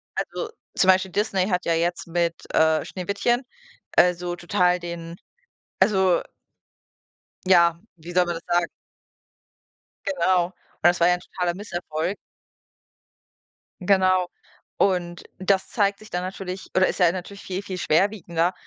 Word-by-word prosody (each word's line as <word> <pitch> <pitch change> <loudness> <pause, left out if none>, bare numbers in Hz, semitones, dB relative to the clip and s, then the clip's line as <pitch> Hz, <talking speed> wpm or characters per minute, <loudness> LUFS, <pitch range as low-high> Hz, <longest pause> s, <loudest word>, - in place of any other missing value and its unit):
Also, 465 - -3 0.3
zum 190 - +3
Beispiel 185 0 +4
Disney 195 -2 0
hat 180 -1 0
ja 170 - +2
jetzt 175 +1 -1
mit, 170 0 -2
äh, 160 -1 +3
Schneewittchen, 200 +7 -1 0.5
äh, 180 0 +6
so 175 0 -5
total 180 0 +1
den 170 0 -7 0.6
also 190 -4 +3 1.3
ja, 170 -2 +5 0.2
wie 170 +2 -10
soll 180 0 +3
man 175 - -2
das - - -9
sagen? 175 -1 +2 1.4
Genau. 185 -11 +2
Und 185 - -15 0.3
das 175 0 +4
war 170 - +5
ja 180 - +5
'n 180 - -5
totaler 180 -2 -3
Misserfolg. 175 -2 -4 1.6
Genau. 185 -1 +3 0.5
Und 175 -3 0 0.2
das 190 0 +1
zeigt 200 -2 +1
sich 215 - -14
dann 180 +1 -2
natürlich 185 0 -6
oder 185 0 +4
ist - - -3
ja 175 -2 +5
natürlich 190 +2 -7
viel, 190 +1 -4
viel 190 -2 -6
schwerwiegender, 175 -1 +1
180 Hz, 140 wpm, -24 LUFS, 175-190 Hz, 1.6 s, äh